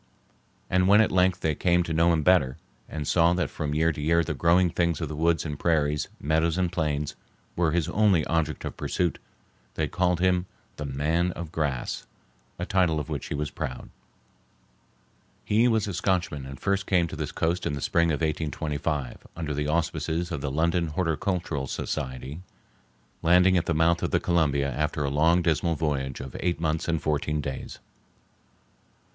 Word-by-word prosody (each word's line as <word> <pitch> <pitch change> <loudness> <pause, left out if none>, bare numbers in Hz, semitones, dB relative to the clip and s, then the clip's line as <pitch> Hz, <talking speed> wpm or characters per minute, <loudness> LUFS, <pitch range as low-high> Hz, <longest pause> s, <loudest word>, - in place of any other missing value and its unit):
And 90 0 +2
when 100 +2 +6
at 110 - +4
length 90 0 +2
they 80 - +1
came 90 +3 +2
to 85 - -3
know 85 +2 +4
him 80 -2 +1
better, 75 -7 +3 0.3
and 75 -2 -5
saw 85 0 +4
that 90 -4 -1
from 75 -1 -3
year 80 +2 +3
to 75 - -6
year 85 +3 +3
the - - -3
growing 85 +1 +3
things 85 -2 0
of 80 -4 -3
the 75 - -5
woods 80 +2 +1
and 75 -2 -4
prairies, 75 -3 +1
meadows 80 +3 +1
and 90 -2 +1
plains, 75 -4 -1 0.4
were 85 -2 +2
his 85 -2 0
only 100 -7 +3
object 80 -2 -1
of - - -5
pursuit, 90 -2 -1 0.6
they - - 0
called 90 -2 +1
him 90 0 +2 0.3
the 75 - -4
"Man 80 +6 0
of 85 -2 -7
Grass," 70 -7 -2 0.5
a 90 - -3
title 90 -6 +2
of 75 - -5
which 75 -4 -4
he - - -3
was 75 0 -3
proud. 65 -2 -6 1.5
He 110 +4 +3
was 110 -3 +1
a 100 - -3
Scotchman 85 -6 -1
and 65 -1 -9
first 100 -1 0
came 90 -3 +3
to - - -7
this - - -4
coast 85 +2 -1
in - - -2
the 70 - -3
spring 85 +4 +2
of 75 -1 -1
1825 75 -3 -2
under 80 -3 -3
the 75 +1 -2
auspices 85 +1 -1
of 80 -5 -3
the 70 - -2
London 85 +4 +1
Horticultural 80 -3 -1
Society, 65 +5 -4 0.8
landing 90 +2 +5
at 85 -1 +1
the 80 - +1
mouth 85 +2 +3
of - - 0
the - - +2
Columbia 70 -5 +1
after 75 +2 -1
a 70 - -1
long 80 +4 +3
dismal 85 +1 +1
voyage 70 -4 -2
of 65 -2 -8
eight 85 -2 -1
months 80 -1 -1
and 80 -1 +1
fourteen 75 0 -1
days. 70 -2 -5
80 Hz, 185 wpm, -26 LUFS, 75-90 Hz, 1.5 s, when